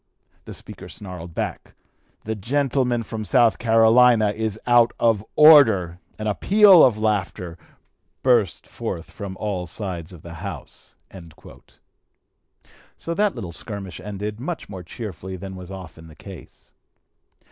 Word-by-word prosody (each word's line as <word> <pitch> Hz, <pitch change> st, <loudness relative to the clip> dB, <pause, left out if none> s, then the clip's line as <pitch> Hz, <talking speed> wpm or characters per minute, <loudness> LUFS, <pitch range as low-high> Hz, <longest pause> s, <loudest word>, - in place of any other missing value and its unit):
The -, -, -9 dB
Speaker -, -, -11 dB
snarled 90 Hz, -4 st, -9 dB
back, -, -, -5 dB, 0.5 s
'The 110 Hz, -, -3 dB
gentleman 125 Hz, +2 st, -1 dB
from 110 Hz, 0 st, -6 dB
South 120 Hz, 0 st, +3 dB
Carolina 115 Hz, -1 st, +4 dB
is 110 Hz, 0 st, -4 dB
out 120 Hz, -1 st, +4 dB
of 110 Hz, -3 st, +2 dB
order!' 110 Hz, -, +6 dB, 0.2 s
and 110 Hz, -, -4 dB
a 105 Hz, -, +1 dB
peal 200 Hz, -, +6 dB
of 120 Hz, -5 st, +4 dB
laughter 100 Hz, -5 st, -2 dB, 0.7 s
burst 120 Hz, -8 st, +2 dB
forth 80 Hz, -, -6 dB
from 95 Hz, -2 st, -8 dB
all 95 Hz, -4 st, -3 dB
sides 90 Hz, -3 st, -6 dB
of 85 Hz, -3 st, -14 dB
the 85 Hz, -, -9 dB
House." -, -, -8 dB, 2.0 s
So 170 Hz, -, -4 dB
that 205 Hz, +2 st, 0 dB
little 95 Hz, -8 st, -6 dB
skirmish 100 Hz, 0 st, -6 dB
ended, 105 Hz, +2 st, -6 dB
much 160 Hz, +6 st, -5 dB
more 95 Hz, -3 st, -8 dB
cheerfully 95 Hz, 0 st, -8 dB
than 95 Hz, +1 st, -8 dB
was 90 Hz, -1 st, -10 dB
often 90 Hz, -4 st, -10 dB
the 80 Hz, -, -15 dB
case. 95 Hz, +1 st, -13 dB
105 Hz, 135 wpm, -22 LUFS, 95-120 Hz, 2.0 s, order